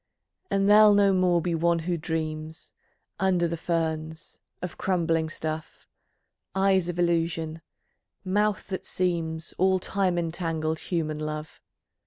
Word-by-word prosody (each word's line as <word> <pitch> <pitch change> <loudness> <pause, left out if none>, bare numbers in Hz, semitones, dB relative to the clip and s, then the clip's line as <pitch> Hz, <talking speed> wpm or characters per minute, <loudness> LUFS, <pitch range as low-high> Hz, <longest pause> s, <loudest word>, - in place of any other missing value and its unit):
And 195 0 +2
there'll 210 0 +7
no 200 -1 +4
more 180 -2 +3
be 175 - -1
one 170 +1 +2
who 170 +2 -1
dreams 160 -1 -4 0.5
Under 180 -2 +2
the 170 - -2
ferns, 160 -1 -3 0.2
of 180 -1 -5
crumbling 165 -4 0
stuff, 155 0 -5 0.7
Eyes 190 -2 +3
of 175 - -4
illusion, 165 -2 0 0.6
mouth 205 +2 +1
that 190 - -4
seems, 165 -3 -2
All 190 +1 +4
time 185 -1 0
entangled 165 -2 -2
human 155 -4 -2
love. 155 0 -5
170 Hz, 125 wpm, -26 LUFS, 160-185 Hz, 0.7 s, there'll